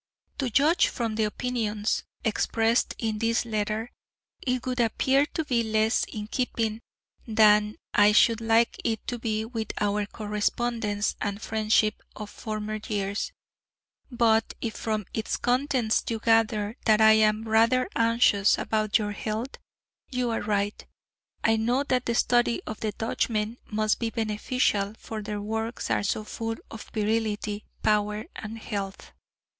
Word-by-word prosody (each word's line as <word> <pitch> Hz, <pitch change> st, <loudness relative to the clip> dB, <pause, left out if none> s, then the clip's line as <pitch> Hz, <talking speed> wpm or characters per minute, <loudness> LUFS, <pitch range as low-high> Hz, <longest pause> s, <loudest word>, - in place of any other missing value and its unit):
To 265 Hz, -3 st, 0 dB
judge 295 Hz, +8 st, +4 dB
from 230 Hz, -3 st, -2 dB
the 220 Hz, 0 st, +1 dB
opinions 215 Hz, -2 st, -1 dB, 0.2 s
expressed 225 Hz, +1 st, +1 dB
in 220 Hz, -2 st, -2 dB
this 230 Hz, +1 st, +1 dB
letter, 215 Hz, +1 st, -2 dB, 0.5 s
it 250 Hz, -1 st, -1 dB
would 255 Hz, -1 st, -2 dB
appear 265 Hz, +5 st, +2 dB
to 320 Hz, -, -3 dB
be 245 Hz, -4 st, +1 dB
less 220 Hz, 0 st, +1 dB
in 210 Hz, -1 st, -6 dB
keeping 225 Hz, -1 st, -2 dB, 0.5 s
than 210 Hz, -1 st, +4 dB, 0.2 s
I 205 Hz, 0 st, +6 dB
should 230 Hz, +1 st, +4 dB
like 225 Hz, +1 st, +2 dB
it 225 Hz, -2 st, -1 dB
to 245 Hz, -, -4 dB
be 220 Hz, -1 st, -1 dB
with 225 Hz, -1 st, -4 dB
our 205 Hz, 0 st, 0 dB
correspondence 210 Hz, 0 st, -1 dB
and 205 Hz, -1 st, -2 dB
friendship 215 Hz, -1 st, +1 dB
of 210 Hz, -1 st, -7 dB
former 215 Hz, 0 st, -4 dB
years; 200 Hz, -1 st, -2 dB, 0.8 s
but 230 Hz, -3 st, +2 dB
if 225 Hz, -2 st, -3 dB
from 215 Hz, -2 st, -2 dB
its 220 Hz, -, -2 dB
contents 250 Hz, -2 st, +1 dB
you 230 Hz, -, -1 dB
gather 225 Hz, 0 st, +2 dB
that 215 Hz, -1 st, +5 dB
I 220 Hz, 0 st, +7 dB
am 215 Hz, 0 st, +4 dB
rather 230 Hz, +3 st, +3 dB
anxious 230 Hz, -3 st, +4 dB
about 215 Hz, -2 st, +1 dB
your 210 Hz, -2 st, -2 dB
health, 220 Hz, +5 st, -4 dB, 0.5 s
you 250 Hz, -2 st, -1 dB
are 225 Hz, -, -1 dB
right. 205 Hz, 0 st, -1 dB, 0.6 s
I 225 Hz, 0 st, +3 dB
know 240 Hz, +5 st, +1 dB
that 255 Hz, -3 st, 0 dB
the 235 Hz, -, 0 dB
study 240 Hz, 0 st, +2 dB
of 215 Hz, -, -6 dB
the 215 Hz, -, -1 dB
Dutchmen 220 Hz, +1 st, -2 dB
must 215 Hz, 0 st, +1 dB
be 230 Hz, -, -1 dB
beneficial; 215 Hz, -1 st, 0 dB
for 220 Hz, -1 st, -6 dB
their 210 Hz, 0 st, -4 dB
works 220 Hz, +3 st, -3 dB
are -, -, +2 dB
so 205 Hz, +1 st, -1 dB
full 225 Hz, +1 st, -4 dB, 0.2 s
of 225 Hz, -, -9 dB
virility, 215 Hz, -1 st, -1 dB, 0.2 s
power 210 Hz, 0 st, +1 dB
and 220 Hz, +1 st, -7 dB
health. 200 Hz, -3 st, -5 dB
220 Hz, 145 wpm, -27 LUFS, 210-230 Hz, 0.8 s, I